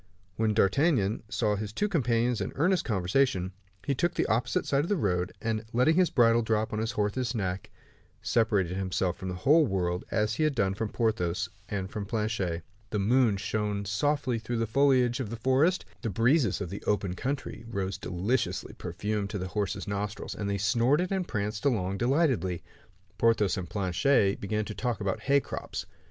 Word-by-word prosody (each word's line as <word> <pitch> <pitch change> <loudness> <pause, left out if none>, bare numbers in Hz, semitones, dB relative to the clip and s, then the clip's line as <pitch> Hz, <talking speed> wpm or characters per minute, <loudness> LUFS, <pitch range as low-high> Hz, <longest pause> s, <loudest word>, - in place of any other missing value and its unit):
When 110 -1 +1
D'Artagnan 110 - +2
saw 105 -2 +1
his 105 0 -4
two 205 - 0
companions 120 - +1
in - - -3
earnest 180 +5 +2
conversation, 95 -1 +1 0.3
he 140 - +1
took 175 +6 0
the - - +1
opposite 120 +4 0
side 140 - +1
of 170 - -4
the 205 - +3
road, 90 - 0
and 110 -1 -2
letting 125 +7 +4
his 180 -1 +4
bridle 115 -2 +4
drop 110 -1 0
upon 105 - -3
his 110 +1 -2
horse's 115 +4 -1
neck, 95 -3 -3 0.5
separated 105 -6 +1
himself 95 -1 -1
from 95 +1 -6
the 90 - -3
whole 150 - +5
world, 90 -3 -1
as 110 0 +1
he 155 - 0
had 155 -2 +1
done 95 -5 +1
from 105 +2 -3
Porthos 90 -8 0 0.2
and 95 -1 -3
from 105 -2 -4
Planchet. 105 -7 -1 0.3
The 105 - -2
moon 110 +1 +3
shone 105 0 -2
softly 125 +4 0
through 115 +2 -3
the 115 - +1
foliage 125 +1 +3
of 125 -6 -3
the 115 - -4
forest. 130 +10 +2 0.2
The 115 - -2
breezes 115 - +2
of 90 -3 -4
the 100 - -5
open 100 -3 +1
country 135 +5 -4
rose 95 -3 -3
deliciously 100 +8 -1
perfumed 105 +3 -3
to 105 - -3
the 95 -1 -4
horse's 100 -1 -2
nostrils, 100 +1 -3
and 100 -1 -3
they 100 - 0
snorted 120 - +2
and 190 -2 -1
pranced 105 -1 -3
along 100 -8 0
delightedly. 125 - +1 0.6
Porthos 110 -4 +3
and 90 -3 -5
Planchet 100 +2 +2
began 105 +1 -1
to 105 - -5
talk 120 +1 -2
about 100 -2 -1
hay 140 +1 +3
crops. - - -6
110 Hz, 185 wpm, -28 LUFS, 100-125 Hz, 0.6 s, whole